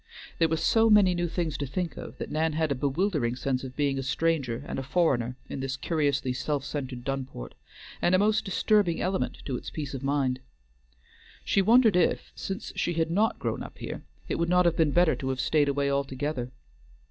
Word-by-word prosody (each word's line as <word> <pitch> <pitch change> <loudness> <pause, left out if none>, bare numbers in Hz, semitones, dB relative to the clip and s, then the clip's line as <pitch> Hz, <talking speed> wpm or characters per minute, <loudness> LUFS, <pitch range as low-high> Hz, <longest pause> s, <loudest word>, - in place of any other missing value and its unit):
There 165 - +5
were 160 0 0
so 225 +7 +3
many 205 -4 +6
new 175 0 0
things 165 -2 -2
to 140 - -2
think 170 +5 -3
of, - - -9
that - - -6
Nan 160 +1 +1
had 155 -1 0
a - - +4
bewildering 140 - 0
sense 130 0 -2
of 130 -1 -7
being 140 -2 0
a - - -1
stranger 135 -3 0
and - - -3
a - - -2
foreigner 130 -5 +1
in - - -5
this 135 0 -3
curiously 140 -5 0
self 140 +1 -2
centred 130 -4 -5
Dunport, 130 - -5 0.5
and 175 - +4
a - - +5
most 215 +2 +2
disturbing 195 -3 +2
element 190 +1 -1
to 130 -3 -2
its - - -7
peace 145 -3 -5
of 135 - -5
mind. 135 -2 0 1.1
She 195 - +3
wondered 225 0 +5
if, 180 - +1
since 195 0 -5
she 175 - 0
had 165 0 0
not 215 +6 +2
grown - - -3
up - - -9
here, - - -6 0.3
it - - -2
would 170 0 +1
not 180 0 +4
have 170 -1 +3
been 160 -2 +3
better 175 +3 +3
to 130 - -3
have 130 -1 -2
stayed 145 0 +2
away 140 0 0
altogether. 135 -2 -2
150 Hz, 205 wpm, -27 LUFS, 135-175 Hz, 1.1 s, many